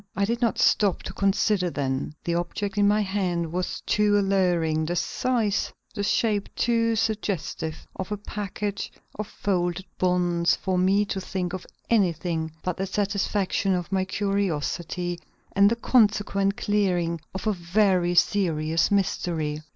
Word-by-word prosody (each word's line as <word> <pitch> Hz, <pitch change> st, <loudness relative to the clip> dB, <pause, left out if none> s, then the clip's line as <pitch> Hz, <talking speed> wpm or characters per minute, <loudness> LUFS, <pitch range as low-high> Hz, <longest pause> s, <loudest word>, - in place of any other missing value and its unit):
I 200 Hz, +1 st, +2 dB
did 235 Hz, +4 st, -2 dB
not 235 Hz, -2 st, +1 dB
stop 200 Hz, -4 st, +3 dB
to -, -, -6 dB
consider 200 Hz, -1 st, +2 dB
then. 140 Hz, -1 st, -2 dB
The 170 Hz, -, -1 dB
object 175 Hz, +4 st, -2 dB
in 205 Hz, -1 st, +4 dB
my 210 Hz, +1 st, +3 dB
hand 185 Hz, -5 st, -1 dB
was 180 Hz, +1 st, -3 dB
too 210 Hz, -1 st, +2 dB
alluring; 175 Hz, -5 st, +2 dB
the 175 Hz, +2 st, -2 dB
size, 220 Hz, +2 st, 0 dB, 0.2 s
the -, -, -3 dB
shape 205 Hz, 0 st, +1 dB
too 230 Hz, -1 st, +2 dB
suggestive 200 Hz, -7 st, -2 dB
of 190 Hz, +2 st, -5 dB
a 210 Hz, -, -1 dB
package 205 Hz, 0 st, -4 dB, 0.3 s
of 215 Hz, -, -2 dB
folded 180 Hz, -2 st, -1 dB
bonds 175 Hz, -2 st, +2 dB
for 185 Hz, -1 st, -1 dB
me 195 Hz, +3 st, +3 dB
to 195 Hz, -1 st, -3 dB
think 180 Hz, -1 st, -3 dB
of 185 Hz, -, -6 dB, 0.2 s
anything 170 Hz, -6 st, +1 dB
but 180 Hz, -2 st, -2 dB
the 195 Hz, -, -2 dB
satisfaction 200 Hz, -1 st, 0 dB
of 180 Hz, 0 st, -4 dB
my 190 Hz, -1 st, +2 dB
curiosity 180 Hz, -3 st, -2 dB, 0.3 s
and 200 Hz, 0 st, +5 dB
the 230 Hz, -, +1 dB
consequent 205 Hz, -4 st, +2 dB
clearing 180 Hz, -5 st, 0 dB
of 190 Hz, -, -4 dB
a 215 Hz, -, +2 dB
very 180 Hz, -1 st, +2 dB
serious 165 Hz, -4 st, +2 dB
mystery. 165 Hz, -6 st, 0 dB
190 Hz, 145 wpm, -25 LUFS, 175-205 Hz, 0.3 s, and